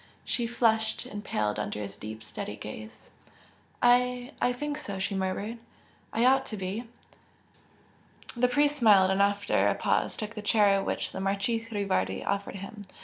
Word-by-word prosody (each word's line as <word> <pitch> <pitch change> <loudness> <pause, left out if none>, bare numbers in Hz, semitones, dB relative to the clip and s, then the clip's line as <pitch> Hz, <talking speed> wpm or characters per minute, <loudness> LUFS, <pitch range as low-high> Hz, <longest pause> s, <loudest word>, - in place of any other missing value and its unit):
She 240 -2 0
flushed 225 -2 +1
and 205 0 -7
paled 105 0 -1
under 105 0 -3
his 100 -1 -5
deep, 110 +1 -8
steady 105 -1 -6
gaze. 110 0 -9 0.7
"I 250 +1 +3
I 245 - +3
think 295 +4 -3
so!" 200 -9 -5
she 195 +2 -2
murmured 195 +4 -2 0.5
"I 230 +2 +2
ought 265 +1 +5
to 215 - -5
be!" 195 +5 -3 1.5
The 245 +1 +3
priest 290 +3 +2
smiled 200 -6 +6
and 190 +1 +2
after 200 0 +2
a - - +2
pause - - 0
took 215 +1 -5
the 210 - -6
chair 205 -2 +4
which - - -2
the - - -5
Marchese 200 +4 0
Rivardi 200 -3 -1
offered 200 -1 -2
him. 200 +2 -8
205 Hz, 160 wpm, -28 LUFS, 190-240 Hz, 1.5 s, smiled